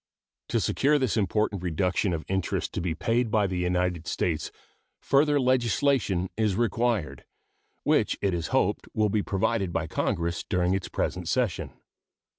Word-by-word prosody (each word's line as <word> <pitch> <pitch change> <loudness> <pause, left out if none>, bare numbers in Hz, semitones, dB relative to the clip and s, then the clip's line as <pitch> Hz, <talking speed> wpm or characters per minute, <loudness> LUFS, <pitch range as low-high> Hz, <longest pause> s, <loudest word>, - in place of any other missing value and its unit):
To - - +1
secure 150 +2 +2
this 130 -6 0
important 105 -1 0
reduction 90 +3 0
of 80 -2 -3
interest 95 -1 -2
to - - -2
be 85 -2 -2
paid 115 +5 0
by 105 -1 +2
the 95 -2 -2
United 90 -1 0
States 80 -3 -1 0.5
further 145 +1 +3
legislation 125 -6 +2
is 105 -3 +1
required, 115 - 0 0.6
which - - +2
it 100 -2 0
is 85 -3 -2
hoped - - 0
will 105 -1 +2
be 105 +1 +1
provided 100 -1 0
by 90 - -1
Congress 85 +1 -1
during 90 0 +1
its 95 -1 -2
present 90 -1 -2
session. 120 -3 -1
95 Hz, 150 wpm, -27 LUFS, 90-115 Hz, 0.6 s, further